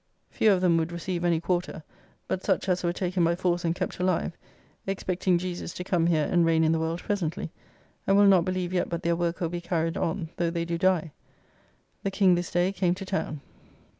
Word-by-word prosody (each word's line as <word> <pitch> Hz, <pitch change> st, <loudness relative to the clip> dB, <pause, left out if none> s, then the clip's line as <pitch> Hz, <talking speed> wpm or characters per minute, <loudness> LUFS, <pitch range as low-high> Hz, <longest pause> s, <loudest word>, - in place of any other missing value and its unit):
Few 215 Hz, -, +3 dB
of 185 Hz, -2 st, +2 dB
them 175 Hz, -2 st, +4 dB
would 165 Hz, +1 st, -1 dB
receive 170 Hz, 0 st, -3 dB
any 170 Hz, -2 st, +2 dB
quarter, 175 Hz, -2 st, -2 dB, 0.4 s
but 185 Hz, -, -2 dB
such -, -, 0 dB
as 180 Hz, -1 st, +1 dB
were 170 Hz, -, +1 dB
taken 180 Hz, 0 st, -1 dB
by 170 Hz, +1 st, +3 dB
force 175 Hz, -1 st, 0 dB
and 165 Hz, 0 st, 0 dB
kept -, -, -4 dB
alive; 180 Hz, -2 st, 0 dB, 0.5 s
expecting 185 Hz, -1 st, 0 dB
Jesus 175 Hz, -1 st, -5 dB
to 180 Hz, -, -4 dB
come 175 Hz, -2 st, +1 dB
here 160 Hz, -3 st, +2 dB
and 175 Hz, -1 st, +2 dB
reign 165 Hz, -1 st, +3 dB
in 160 Hz, -, +3 dB
the 165 Hz, -, +1 dB
world 165 Hz, +2 st, -2 dB
presently, 185 Hz, -4 st, -2 dB, 0.6 s
and 195 Hz, -, +4 dB
will 205 Hz, -, +6 dB
not 190 Hz, -3 st, +6 dB
believe 185 Hz, 0 st, -2 dB
yet 180 Hz, -, 0 dB
but 170 Hz, +1 st, -4 dB
their 170 Hz, -1 st, +2 dB
work 170 Hz, +1 st, -2 dB
will 170 Hz, -, 0 dB
be 175 Hz, 0 st, -4 dB
carried 165 Hz, -1 st, -1 dB
on 165 Hz, 0 st, -2 dB
though 170 Hz, -1 st, +1 dB
they 170 Hz, 0 st, -2 dB
do 170 Hz, 0 st, -2 dB
die. 180 Hz, -4 st, +2 dB, 0.9 s
The 195 Hz, -, -1 dB
King 190 Hz, -1 st, +4 dB
this 175 Hz, 0 st, -1 dB
day 175 Hz, +2 st, +1 dB
came 180 Hz, -2 st, +1 dB
to 195 Hz, +1 st, -7 dB
town. 160 Hz, -6 st, -3 dB
175 Hz, 220 wpm, -27 LUFS, 170-185 Hz, 0.9 s, will